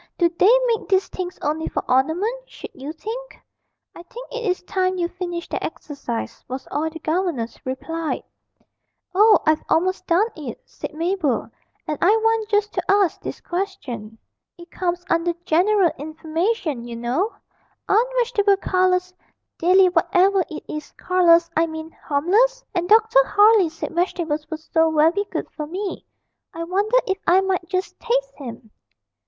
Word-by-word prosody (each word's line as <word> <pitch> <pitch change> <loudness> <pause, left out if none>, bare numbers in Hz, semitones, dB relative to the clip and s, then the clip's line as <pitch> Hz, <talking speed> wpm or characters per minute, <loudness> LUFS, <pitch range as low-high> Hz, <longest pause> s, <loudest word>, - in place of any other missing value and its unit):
Do 345 - +4
they 390 +8 +5
make 460 -3 -1
these 385 -1 +3
things 365 -1 -5
only 310 +2 -1
for - - -3
ornament, 360 - 0
should - - -10
you 275 +3 -7
think?' 455 +10 -7 0.5
'I - - -10
think - - -10
it 485 -1 -4
is 365 - -1
time 370 0 0
you 345 -1 0
finished 350 -1 -6
that - - -2
exercise,' 275 -6 -5
was 260 +2 -6
all 310 +2 -1
the 320 - -9
governess 315 -8 -2
replied. 320 +5 -3 0.9
'Oh, 425 +3 +6
I've 310 0 +3
almost 370 +2 +1
done 350 +5 +4
it,' 285 -7 -7
said - - -8
Mabel, 335 -4 -1 0.4
'and 300 - -3
I - - +4
want 445 0 +2
just 420 0 +1
to - - -1
ask 395 -4 +2
this - - -6
question 285 - -5 0.4
(it 345 0 -14
comes 355 -1 -2
under 335 0 +1
"general 365 +2 +3
information," 315 - -2
you 240 -1 -7
know) 250 - -1 0.5
aren't 455 +5 +3
vegetable 425 -5 +3
colours 365 -1 +1 0.5
"dilly 370 +2 +5
whatever 370 +2 +3
it 315 - -7
is" 305 0 -6
colours 345 -2 +4
I 330 +1 +3
mean 315 0 -7
harmless? 420 +15 +1
And 350 -1 -1
Dr. 445 +3 +6
Harley 420 -5 +5
said 330 +1 -6
vegetables 330 -3 -1
were 315 - -3
so 320 +1 +1
very 325 +6 +3
good - - -3
for 300 -1 -6
me. 380 +4 -5 0.5
I 335 - -4
wonder 400 +7 +1
if 385 -1 -1
I 370 +2 +5
might 375 -2 -1
just 370 0 -3
taste - - -1
him.' 235 -5 -9
355 Hz, 160 wpm, -22 LUFS, 315-400 Hz, 0.9 s, Oh